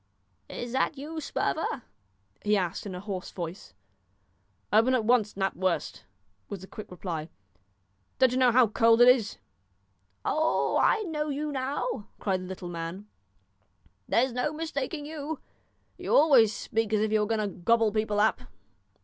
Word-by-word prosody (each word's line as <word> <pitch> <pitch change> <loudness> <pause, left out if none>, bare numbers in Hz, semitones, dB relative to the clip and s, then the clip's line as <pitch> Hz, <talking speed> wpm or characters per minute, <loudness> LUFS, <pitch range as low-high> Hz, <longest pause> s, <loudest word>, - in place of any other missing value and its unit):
"Is 240 -1 -6
that 265 +3 0
you, 315 +3 -6
Sperver?" 290 -4 -2 0.6
he 210 0 +2
asked 180 +1 -2
in 190 - -6
a - - -5
hoarse 195 -2 -5
voice. 170 - -7 1.0
"Open 230 +5 +5
at 230 -4 0
once, 225 -3 +2
Knapwurst," 190 -2 -1 0.4
was 200 -3 -6
the - - -9
quick 210 +2 -10
reply. 170 -3 -5 0.9
"Don't 260 -2 +4
you 255 - 0
know 250 -1 +5
how 250 +1 +6
cold 225 +1 +4
it 245 - +8
is?" 250 -4 +4 0.9
"Oh! 315 +1 +1
I 435 - +3
know 305 -5 -3
you 295 +1 -2
now," 270 - -3
cried 190 -3 -1
the 185 - -7
little 185 -1 -7
man; 175 +4 -6 1.0
"there's 250 +1 +2
no 250 +4 -1
mistaking 305 -1 -4
you. 305 0 -5 0.6
You - - 0
always 270 -8 +6
speak 220 0 -2
as 210 - +3
if 215 0 0
you 215 - +3
were 210 - +1
going 225 0 0
to 195 - -8
gobble 225 +4 +3
people 215 -1 0
up." 215 +1 +2
225 Hz, 160 wpm, -28 LUFS, 200-270 Hz, 1.0 s, it